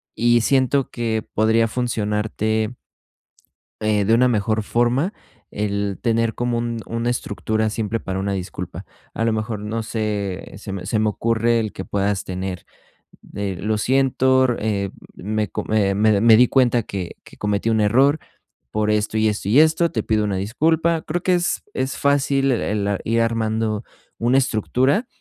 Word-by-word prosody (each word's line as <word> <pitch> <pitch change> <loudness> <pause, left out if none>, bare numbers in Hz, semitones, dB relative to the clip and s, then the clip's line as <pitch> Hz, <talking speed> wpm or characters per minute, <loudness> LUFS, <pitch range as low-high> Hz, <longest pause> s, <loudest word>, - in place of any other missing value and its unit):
y 120 0 +3
siento 135 +2 +2
que 115 -2 -2
podría 110 +1 +3
funcionarte 110 -1 -1 1.0
eh, 105 -2 +1
de 110 - +3
una 125 +2 +5
mejor 110 -2 +1
forma, 120 - +1 0.4
el 100 -1 -2
tener 115 -1 +1
como 120 -1 -1
un 115 -1 -2
una 115 +1 -2
estructura 110 -2 -1
simple 110 0 -2
para 95 -2 -4
una 100 +1 -1
disculpa. 95 -2 -6 0.3
A 115 - -1
lo 115 - +2
mejor 110 0 -3
no 110 +2 -3
sé, 105 -4 -3
se 100 0 -8
me 95 -2 -5
se 110 +3 0
me 110 0 +2
ocurre 115 +2 +1
el 110 -2 -3
que - - -6
puedas 100 0 -1
tener, 95 -1 -5 0.7
eh, 100 -2 -3
"lo 105 +1 0
siento, 130 +1 +3
r 120 -2 +1
eh, 100 -2 -1 0.2
me 105 +1 -2
co - - -4
m 105 -2 +2
eh, - - 0
me 110 +2 +3
me 100 - +2
me 115 0 +7
di 125 +1 +5
cuenta 125 -3 +3
que 95 -4 -6
que - - -15
cometí 105 +2 -1
un 110 -1 +2
error, 135 +8 +4 0.5
por 105 0 0
esto 105 +1 0
y 110 0 +3
esto 100 -2 -3
y 125 +7 +5
esto, 160 +2 +4
te 110 - -2
pido 110 -1 +1
una 100 -2 -1
disculpa". 160 - +1
Creo 175 +3 -3
que 185 - +2
es 175 0 -1
es 130 +1 -2
fácil 140 -1 +2
el, 105 -4 -1
ah, 100 -1 -1
ir 115 +1 +1
armando 110 -1 -1 0.4
una 120 +3 +3
estructura 130 - +1
110 Hz, 175 wpm, -21 LUFS, 105-120 Hz, 1.0 s, me